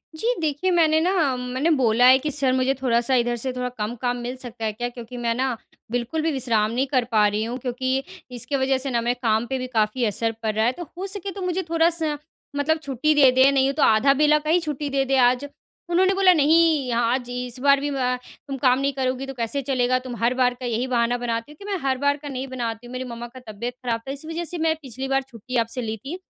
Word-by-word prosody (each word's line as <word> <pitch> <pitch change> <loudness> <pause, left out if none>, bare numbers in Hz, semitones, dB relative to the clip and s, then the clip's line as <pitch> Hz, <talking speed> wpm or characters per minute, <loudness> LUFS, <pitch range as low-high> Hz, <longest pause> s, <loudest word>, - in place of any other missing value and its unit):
जी। 460 +10 0
देखिए, 310 +4 0
मैंने 320 -3 +4
ना 330 -7 +2
मैंने 250 +5 -1
बोला 240 0 +4
है 260 +1 +8
कि, 300 +2 -3
"सर 260 -1 +2
मुझे 260 +1 +2
थोड़ा-सा 240 0 +2
इधर 240 -1 +1
से 255 +3 -3
थोड़ा 250 0 -3
कम 215 +2 -3
काम 245 -1 0
मिल 245 +1 -5
सकता 240 -3 -7
है 215 - -1
क्या 240 +3 -3
क्योंकि 245 0 -9
मैं 235 -1 0
ना 255 -1 -1 0.3
बिल्कुल 245 +6 -1
भी 320 0 0
विश्राम 230 -5 +1
नहीं 250 +3 0
कर 260 -2 +1
पा 210 -2 +4
रही 210 +1 -1
हूँ? 235 +3 -3
क्योंकि 260 +1 -2 0.3
इसकी 250 +4 -3
वज़ह 265 0 +2
से 265 +1 -3
ना 235 -1 +1
मेरे 240 +1 +1
काम 220 0 +2
पे 265 - -2
भी 255 - -4
काफ़ी 220 +2 +1
असर 225 +2 0
पड़ 215 -1 0
रहा 220 +1 +2
है 240 - +3
तो 350 - -5
हो 380 +2 -4
सके 395 0 -4
तो 390 - -8
मुझे 365 0 -1
थोड़ा-सा 325 -2 +1 0.4
मतलब 285 +3 +1
छुट्टी 280 +3 +1
दे 270 -3 +7
दें, 260 +2 +5
नहीं 270 0 +2
तो 290 0 +1
आधा 250 +5 +5
बेला 300 +2 +4
का 305 +1 -5
ही 340 +3 +4
छुट्टी 300 -3 -3
दे 275 0 +1
दें 270 0 +1
आज।" 250 +2 +3 0.4
उन्होंने 375 +2 +3
बोला, 385 -1 +5
"नहीं, 310 -3 +3
आज 240 +1 0
इस 250 0 -5
बार 280 +1 +4
भी 290 +1 -2
व 255 -3 0 0.3
तुम 275 -1 -4
काम 255 -1 +3
नहीं 275 0 0
करोगी 260 0 -2
तो 270 - -6
कैसे 245 +3 -2
चलेगा? 255 -2 +1
तुम 255 -1 -7
हर 235 +3 +1
बार 250 -1 +2
का 255 - -6
यही 240 +1 -1
बहाना 240 -1 +1
बनाती 235 +2 -3
हो।" - - -13
कि, 400 - -10
"मैं 390 - 0
हर 265 -1 0
बार 285 +2 +1
का 295 0 -10
नहीं 265 0 -4
बनाती 240 -2 -4
हूँ, - - -11
मेरी 255 0 -3
मम्मा 240 -1 -7
का - - -8
तबियत 235 +4 -5
ख़राब 230 -2 -1
था, - - -3
इस 280 +2 -8
वज़ह 325 +2 -4
से 350 - -5
मैं 320 0 +1
पिछली 265 -1 -6
बार 270 0 +1
छुट्टी 255 -1 -9
आपसे 230 +3 -5
ली 220 -1 -3
थी। 275 - -7
260 Hz, 255 wpm, -23 LUFS, 240-285 Hz, 0.4 s, है